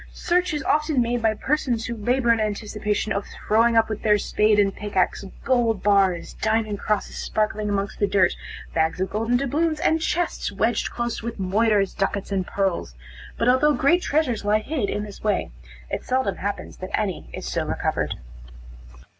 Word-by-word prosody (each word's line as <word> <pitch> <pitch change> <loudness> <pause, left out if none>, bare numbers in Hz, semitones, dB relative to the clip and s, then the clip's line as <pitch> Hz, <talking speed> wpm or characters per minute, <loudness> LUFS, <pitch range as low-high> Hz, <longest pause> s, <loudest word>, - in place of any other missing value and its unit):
Search 360 +1 +1
is 295 -2 -2
often 300 -2 +1
made 240 0 +1
by 220 -1 +2
persons 245 -3 -1
who 235 - -3
labor 240 +2 +2
in 230 - -1
anticipation 210 0 -1
of 200 - -3
throwing 230 +2 +2
up 225 - +4
with 215 -1 -4
their 210 -1 +4
spade 210 +1 +2
and 195 -1 +2
pickaxe, 205 -1 -1 0.2
gold 235 -5 +2
bars, 195 -4 +2
diamond 220 -2 0
crosses 210 -1 -2
sparkling 215 -1 -1
amongst 200 -1 -2
the 205 - +2
dirt, 190 -2 +3 0.4
bags 160 +1 +1
of 190 - -1
golden 225 +3 +1
doubloons, 305 +4 0
and 320 -1 +2
chests, 335 +2 -1
wedged - - 0
close 235 -1 -3
with 230 +1 -5
moidores, 200 +1 +2
ducats 195 0 -2
and 190 -2 -1
pearls; 190 - -1 0.4
but 230 - 0
although 280 +4 +4
great 340 +6 +3
treasures 280 -10 0
lie 205 +1 +3
hid 235 -1 -2
in 210 - -2
this 205 -2 -10
way, 210 - 0 0.4
it - - -3
seldom 255 -6 0
happens 200 +1 -4
that 185 +3 -3
any 200 -5 -3
is - - -7
so - - -1
recovered. - - -1
215 Hz, 175 wpm, -24 LUFS, 200-245 Hz, 0.4 s, up